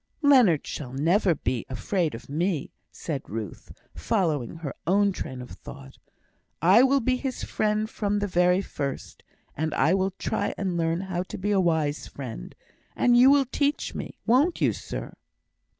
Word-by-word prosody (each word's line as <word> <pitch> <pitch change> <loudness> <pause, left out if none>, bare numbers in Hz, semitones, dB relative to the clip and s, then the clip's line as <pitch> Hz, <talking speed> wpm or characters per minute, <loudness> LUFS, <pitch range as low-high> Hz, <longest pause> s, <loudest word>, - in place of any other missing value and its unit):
"Leonard 250 - +5
shall 130 -5 -6
never 170 +6 +2
be 125 -3 -2
afraid 160 - -1
of 115 - -10
me," 160 +1 -1 0.2
said 145 -5 -4
Ruth, 105 -3 -6 0.2
following 160 - -1
her 160 -4 -6
own 200 +2 +3
train 130 -8 -6
of 125 - -12
thought. 135 -1 -11 0.6
"I 185 +8 +6
will 270 +1 +4
be 255 +2 +1
his 260 -1 -4
friend 215 0 0
from 205 -2 -1
the 205 - 0
very 180 0 +2
first; 140 -6 -5 0.3
and 155 +1 -2
I 155 +6 +3
will 190 0 +1
try - - -2
and 190 -3 -2
learn 165 +1 0
how 185 -2 -3
to 185 - -7
be 205 +3 -1
a 195 -2 +3
wise 160 -4 0
friend, 120 - -8 0.4
and 245 -1 +4
you 250 +2 +7
will 280 -1 +5
teach 285 +3 -1
me, - - -7
won't 275 +10 +3
you, - - +2
sir?" - - -7
180 Hz, 165 wpm, -26 LUFS, 150-210 Hz, 0.6 s, you